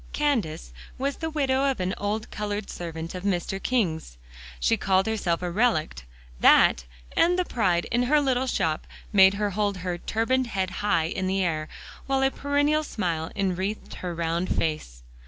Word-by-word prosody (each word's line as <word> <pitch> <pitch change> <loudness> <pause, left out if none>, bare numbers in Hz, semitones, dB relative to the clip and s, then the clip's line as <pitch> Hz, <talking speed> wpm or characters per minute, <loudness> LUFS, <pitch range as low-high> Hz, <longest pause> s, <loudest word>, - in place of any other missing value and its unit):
"Candace" 210 - -1 0.2
was 275 +2 -2
the 320 - -3
widow 275 -3 +1
of 265 - -2
an 185 +1 -1
old 210 +2 -2
colored 210 -1 -4
servant 165 -1 -6
of 180 - -5
Mr. 195 0 -1
King's; 165 - -1 0.4
she - - +3
called 190 0 +2
herself 190 -6 -1
a 175 - -2
"relict;" 170 - 0 0.3
that, - - +5 0.3
and 355 +1 +4
the 365 - +1
pride 180 - +1
in 240 - +2
her 300 +1 +5
little 260 -2 +1
shop, 160 -10 -1 0.3
made 190 -1 +7
her 205 0 -1
hold 205 0 0
her 175 -1 -2
turbaned 250 +6 0
head 190 -4 -2
high 205 -6 +2
in 185 +3 -2
the 190 0 +1
air, 155 -3 -2 0.4
while 270 0 +1
a 270 - +3
perennial 290 +2 +1
smile 170 - -2
enwreathed 195 +2 -2
her 180 -2 -4
round 170 +2 -1
face. 105 - -2
195 Hz, 170 wpm, -26 LUFS, 170-250 Hz, 0.4 s, made